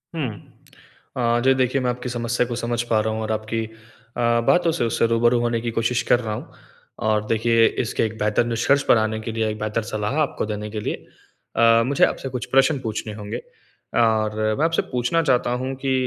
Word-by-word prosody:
हुँ, 145 -6 -1 0.9
अ, 120 -1 +2
जी 135 0 +5
देखिए 130 +1 +1
मैं 125 - 0
आपकी 125 0 -4
समस्या 120 0 -1
को 120 - -4
समझ 120 0 -1
पा 110 - +4
रहा 110 0 -1
हूँ 110 - -3
और 110 0 -3
आपकी 110 +1 -2 0.5
अ, 120 -1 +2
बातों 175 -2 +4
से 160 - -1
उससे 115 0 +1
रूबरू 120 +1 +3
होने 120 -1 0
की 115 -1 -3
कोशिश 115 +2 0
कर 120 - +3
रहा 110 -3 -3
हूँ। - - -9 0.6
और 105 -1 +1
देखिए 115 0 +3 0.2
इसके 115 - -1
एक 110 0 -5
बेहतर 105 +2 +1
निष्कर्ष 120 +4 +2
पर - - +4
आने 110 0 0
के 115 - -5
लिए, 110 -1 -1
एक 105 - -5
बेहतर 110 +2 -1
सलाह 110 +5 -2
आपको 145 - -1
देने 105 0 -4
के 110 - -4
लिए, - - -2 0.6
अ, 115 0 +5
मुझे 140 +2 +4
आपसे 135 - -4
कुछ 125 -1 -4
प्रश्न 135 +2 +4
पूछने 110 -2 -4
होंगे। 105 -1 -6 0.6
और 110 -2 +2 0.2
मैं 160 - +3
आपसे 165 0 +1
पूछना 125 +6 +1
चाहता 125 -4 +2
हूँ 130 +1 -3
कि, 135 - +2
115 Hz, 210 wpm, -22 LUFS, 110-125 Hz, 0.9 s, जी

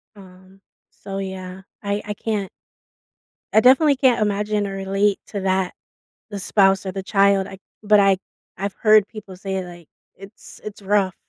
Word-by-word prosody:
Um, 190 0 -17 0.3
so, 195 0 -8
yeah, 190 -1 -6 0.2
I 200 0 -1
I 210 - -3
can't 205 -2 -3 1.0
I 220 - +6
definitely 275 +4 +5
can't 260 -4 +3
imagine 210 0 0
or 195 - -5
relate 195 +1 0
to 205 - -5
that- 190 -1 0 0.6
the 205 - -5
spouse 195 0 +3
or 190 - -4
the 195 0 -5
child- 195 0 +3
I 195 -1 -10 0.2
but 210 -1 +5
I 195 -1 +4 0.4
I've 200 +1 -3
heard 215 -2 +5
people 205 -4 -10
say, 190 0 -4
like, 175 -2 -12 0.3
it's 195 +1 -14
it's 210 -1 -8
rough. 195 -1 +1
195 Hz, 160 wpm, -21 LUFS, 190-210 Hz, 1.0 s, I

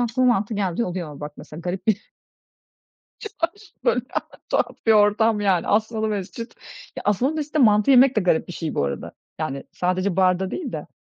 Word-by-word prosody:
aklıma 245 +1 +2
mantı 205 +3 -2
geldiği 200 +2 0
oluyor. 170 -6 -5
Bak, 150 0 -6
mesela 150 +2 -10
garip 180 +2 -4
bir 215 -1 +2 1.2
Çınar 430 - -9 0.5
böyle 240 0 +2 0.4
tuhaf - - 0
bir 225 - +5
ortam 210 +1 +4
yani 190 -4 +2
Asmalı 220 +1 +1
Mescit. 210 +3 -5 0.4
Ya, - - -5
Asmalı 225 +8 +2
Mescit'te 305 0 -2
mantı 215 0 +5
yemek 260 +1 +6
de 215 - +3
garip 180 -3 +1
bir 180 - -7
şey 160 -2 -4
bu 70 - +1
arada. 70 0 -4 0.3
Yani 140 -3 -3
sadece 185 +1 0
barda 185 0 +2
değil 300 -9 -4
de. 150 - -6
205 Hz, 175 wpm, -23 LUFS, 180-230 Hz, 1.2 s, yemek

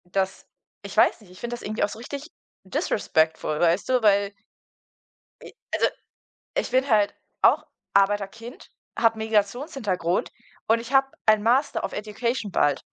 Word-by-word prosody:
Das 190 0 -1 0.4
ich - - -8
weiß - - +4
nicht, 205 - -18
ich 185 - -14
finde 240 0 -5
das 240 - -11
irgendwie 215 +1 -2
auch 205 - +2
so 215 - -9
richtig 280 +5 -7 0.4
disrespectful, 160 -1 0
weißt 175 +2 +2
du? 255 -1 +3
Weil 200 -1 +3 1.1
j - - -11 0.2
also, - - +3 0.7
ich - - -1
bin 260 +2 +2
halt 210 -4 +3 0.3
auch - - +4 0.3
Arbeiterkind, 205 - 0 0.3
habe 225 -1 +3
Migrationshintergrund 215 - 0 0.4
und 225 +1 +4
ich 235 +3 -9
habe 270 0 +5 0.2
ein 215 -1 +5
„Master 250 +6 +2
of - - -3
Education“ 215 +1 -3
bald. 145 -4 +2
215 Hz, 150 wpm, -25 LUFS, 195-240 Hz, 1.1 s, habe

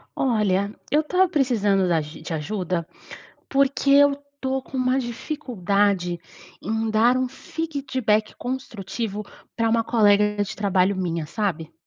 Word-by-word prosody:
Olha, 205 -5 +1 0.2
eu 300 +2 +4
estava 365 +4 +2
precisando 210 - +2
da 165 -2 +2
de 150 +2 -7
ajuda, 175 +1 -2 0.6
porque 275 0 +2
eu 285 0 +7
estou 280 -2 -4
com 265 - -8
uma 255 +1 +2
dificuldade 205 - -1 0.4
em 220 +2 -1
dar 230 +4 +4
um 255 0 +1
feedback 265 -7 -2
construtivo 225 -4 -4 0.3
para 230 -1 +1
uma 230 0 +3
colega 210 -2 +3
de - - -6
trabalho 195 -1 +2
minha, 170 -4 -2
sabe? 170 -2 -3
220 Hz, 125 wpm, -23 LUFS, 195-265 Hz, 0.6 s, eu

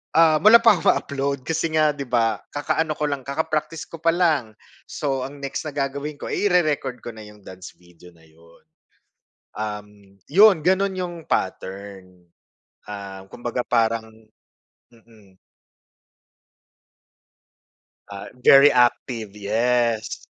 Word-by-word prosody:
ah, 160 -2 +5
wala 225 +6 +7
pa 220 -6 +5
ako - - -9
ma - - +6
upload 140 -2 -3
kasi 165 +2 -1
nga 155 -1 +4
'di 140 -2 -7
ba 115 -2 +1
kakaano 155 +1 -1
ko 150 - -2
lang 135 -2 -5
kaka-practice 155 +2 -3
ko 165 - -9
pa 165 +1 +1
lang 150 -12 +1 0.3
so, 135 -3 -3
ang 140 +1 -13
next 140 +3 -4
na 145 - -7
gagawin 140 +1 -3
ko, - - -6
eh, 205 - 0
i-re-record 155 -9 0
ko 120 - -6
na 110 -1 -11
yung 105 -1 -17
dance 95 0 -11
video 90 0 -19
na 80 - -23
iyon. 80 +1 -22 0.9
Um, 105 -1 -5 0.4
iyon 190 +1 +6
ganon 190 +3 +1
yung 180 -2 -4
pattern, 95 -2 -5 0.6
ah, 100 -2 -8
kumbaga 120 +2 -4
parang 115 -1 0 0.8
mm. 110 -5 -22 2.7
Ah, 100 -1 -8
very 140 +2 +7
active, 120 -4 0
yes. 115 +1 0
125 Hz, 135 wpm, -22 LUFS, 105-155 Hz, 2.7 s, wala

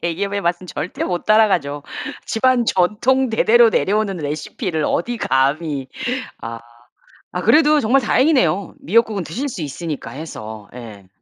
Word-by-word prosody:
대기업의 200 +4 -2
맛은 175 0 -1
절대 180 0 -4
못 175 -1 -3
따라가죠. 180 -10 +2 0.4
집안 250 +1 +2
전통 235 +9 +2
대대로 225 +1 +5
내려오는 205 -1 0
레시피를 155 - -3
어디 240 +8 -1
감히. 140 -1 0 1.4
아. - - -3
아 - - -3
그래도 305 -1 +5
정말 260 +2 +3
다행이네요 235 - +2
미역국은 225 -7 +1
드실 250 - -4
수 185 - -6
있으니까 155 +1 -5
해서. 110 -9 -8
예. 105 -6 -10
185 Hz, 310 characters per minute, -19 LUFS, 155-230 Hz, 1.4 s, 대대로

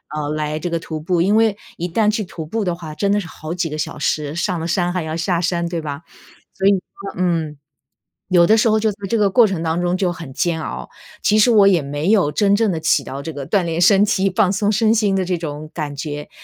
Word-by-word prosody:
呃， 150 -1 -3
来 150 0 -2
这 175 - -3
个 170 -1 -1
徒 160 -1 -6
步？ 170 +2 0
因 200 +5 +3
为 220 -2 +3 0.2
一 175 +1 -2
旦 210 +4 +1
去 215 0 0
徒 170 -3 -8
步 220 +8 -2
的 180 -3 -1
话， 160 -3 -8
真 200 +5 0
的 205 - +2
是 185 - -6
好 160 0 -7
几 175 -2 -2
个 150 - -5
小 155 - -4
时， 150 0 -1
上 170 0 -1
了 165 - -3
山 175 0 0
还 180 -3 -2
要 155 0 -4
下 170 0 0
山 170 0 -1
对 170 -1 -3
吧？ 145 +1 -6 0.5
所 195 - -1
以 200 - +6
说 195 +1 -5
嗯。 165 -5 -1 0.7
有 175 -2 +5
的 215 +5 +5
时 225 - +3
候 215 0 +3
就 220 - +2
在 200 - -8
这 230 - +1
个 205 -2 +2
过 235 +2 +5
程 190 -5 -3
当 165 +1 -1
中 175 0 0
就 185 -2 0
很 165 -6 -9
煎 170 -1 0
熬， - - -6 0.3
其 210 - +3
实 215 +3 +5
我 205 -3 +6
也 180 -4 +3
没 145 +6 -2
有 190 -9 +3
真 200 +2 +3
正 220 -3 +1
的 160 - -3
起 140 - +2
到 135 +1 -6
这 160 - -5
个 140 -2 -7
锻 195 +3 +2
炼 165 0 -2
身 195 +3 +5
体、 195 -1 +1
放 195 -3 +3
松 205 +1 +1
身 220 +1 +3
心 210 -3 +2
的 190 -1 +1
这 180 -1 -1
种 155 -1 -6
感 150 -3 -4
觉， 150 0 -5
175 Hz, 285 characters per minute, -19 LUFS, 155-200 Hz, 0.7 s, 以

